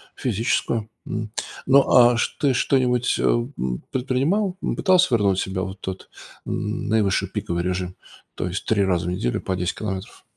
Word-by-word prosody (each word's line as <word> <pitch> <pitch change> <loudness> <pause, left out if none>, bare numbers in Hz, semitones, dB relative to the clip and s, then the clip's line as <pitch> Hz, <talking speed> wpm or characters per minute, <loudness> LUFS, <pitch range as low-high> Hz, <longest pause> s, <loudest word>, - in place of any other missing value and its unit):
физическую, 115 -1 -1 0.2
м. 110 -1 -4 0.3
Ну, 135 +1 +5
а 120 -1 +7
что 140 +4 0
ты - - +3
что-нибудь, 125 -1 +2
э, - - -2
м, 120 - -1
предпринимал? 140 +10 0
Ну, - - -1
пытался 185 -4 +4
вернуть 100 -3 +2
себя 95 0 -2
вот 95 +1 -5
в - - -50
тот, 95 0 -6 0.4
э, - - -7
наивысший 105 -3 0
пиковый 85 0 -2
режим? 90 0 -2 0.4
То - - -2
есть 90 +2 -4
3 105 -3 +2
раза 90 -2 0
в - - 0
неделю 90 -9 -1
по 95 - -2
10 90 0 -2
километров? 95 -2 -5
110 Hz, 175 wpm, -23 LUFS, 95-125 Hz, 0.4 s, а